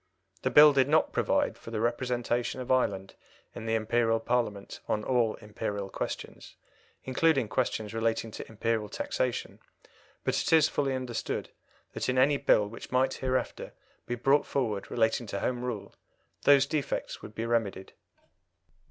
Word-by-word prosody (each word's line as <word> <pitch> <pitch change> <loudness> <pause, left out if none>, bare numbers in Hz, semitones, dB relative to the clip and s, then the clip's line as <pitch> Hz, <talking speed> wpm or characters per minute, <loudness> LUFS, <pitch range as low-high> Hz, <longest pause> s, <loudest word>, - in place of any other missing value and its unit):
The - - 0
Bill 150 0 +8
did 135 0 +3
not 155 +1 +3
provide - - +1
for - - -10
the 115 -2 -3
representation 120 +1 -1
of 125 0 -4
Ireland 100 -7 +1 0.4
in 110 - -7
the 110 - +1
Imperial 115 +1 +1
Parliament 115 -4 -2
on 105 - -1
all 120 -3 +1
Imperial 100 -2 -5
questions, - - -6 0.5
including 135 -1 +2
questions 110 -2 -1
relating 115 0 -1
to - - -8
Imperial 110 -1 -1
taxation, 125 -2 -3 0.6
but - - +1
it - - -2
is 160 -2 +6
fully 135 -2 -1
understood 125 -3 -4 0.4
that - - -2
in 125 - 0
any 140 +3 +4
Bill 105 -5 +3
which 115 - -10
might 130 +1 +2
hereafter 130 -1 -2 0.3
be 120 - -1
brought 135 +4 +2
forward 110 -8 -2
relating 115 0 +1
to 100 - -3
Home 125 +2 -2
Rule 120 -5 -5 0.5
those 140 -1 +7
defects 145 0 -3
would 105 - -11
be 115 - -3
remedied. 115 -5 -1
120 Hz, 150 wpm, -29 LUFS, 110-130 Hz, 0.6 s, Bill